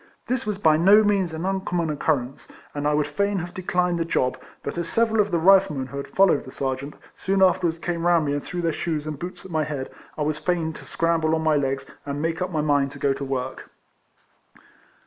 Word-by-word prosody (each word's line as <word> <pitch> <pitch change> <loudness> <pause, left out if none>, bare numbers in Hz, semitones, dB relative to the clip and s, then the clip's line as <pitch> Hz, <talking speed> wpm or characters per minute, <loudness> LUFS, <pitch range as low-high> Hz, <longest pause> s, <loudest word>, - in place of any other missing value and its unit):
This 245 -3 -2
was 210 -2 -1
by 160 -6 +4
no 200 +6 +6
means 200 -4 +1
an 160 +2 -4
uncommon 180 -4 -1
occurrence, 140 -3 -1 0.3
and 145 0 -2
I - - +3
RIFLEMAN - - +1
HARRIS. - - +3
bl - - +1
would 150 - +1
fain 200 0 0
have 175 -1 -5
declined 180 -1 0
the - - +2
job, 130 -5 0 0.3
but 140 - -4
as 170 -1 -2
several 225 -1 +3
of 205 - -1
the 175 - +1
Riflemen 175 -7 +4
who 140 - -7
had 140 - -5
followed 190 -6 +3
the 130 - -11
Serjeant, 135 +2 -3 0.2
soon 195 0 +1
afterwards 180 -3 +3
came 170 0 -2
round 170 -3 +4
me 145 - 0
and 145 - -2
threw 175 -1 -4
their 165 -1 +1
shoes 155 -3 -2
and 155 -2 -5
boots 180 +2 -7
at 190 - -10
my 155 -1 +1
head, 145 -3 -5 0.3
I 150 - 0
was 150 0 -1
fain 165 0 -1
to - - -11
scramble 165 -1 +1
on 160 - -2
my 155 -1 +3
legs, 135 -1 -1 0.2
and 140 0 -4
make 165 +3 -2
up 180 - -1
my 160 -4 -1
mind 145 -2 +2
to - - -9
go 140 -1 +1
to 140 - -6
work. 130 -1 -4
160 Hz, 245 wpm, -24 LUFS, 145-180 Hz, 0.3 s, no